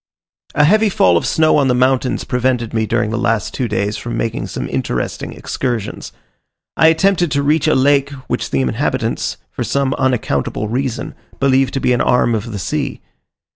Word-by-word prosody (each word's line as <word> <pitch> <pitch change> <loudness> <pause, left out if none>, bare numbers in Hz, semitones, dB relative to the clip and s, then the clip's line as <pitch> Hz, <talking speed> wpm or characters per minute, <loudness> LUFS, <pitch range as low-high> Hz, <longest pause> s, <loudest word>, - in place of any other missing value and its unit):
A 150 - +4
heavy 215 +7 +4
fall 90 - +3
of 85 - +1
snow 155 -1 +3
on 140 -2 +3
the 125 - +2
mountains 130 0 +1
prevented 125 -2 -1
me 110 -1 0
during 115 -1 0
the 115 - -1
last 115 -3 0
two 125 - -1
days, 105 0 -1
from 120 - -5
making 115 - -2
some - - -5
interesting - - -3
excursions. 120 -6 -4 0.6
I 160 - +5
attempted 175 +1 +3
to 140 -1 +1
reach 155 +2 +2
a 155 - +3
lake 140 +1 +3 0.2
which - - -2
the 70 - 0
inhabitants, 65 -2 -1
from - - -4
some 140 -1 0
unaccountable 110 - 0
reason, 130 +2 -3 0.3
believe 135 -1 +3
to 135 - -3
be 125 - +2
an 120 - +1
arm 125 -1 +2
of 110 +1 -3
the 105 - -4
sea. 90 - -3
125 Hz, 180 wpm, -17 LUFS, 115-140 Hz, 0.6 s, I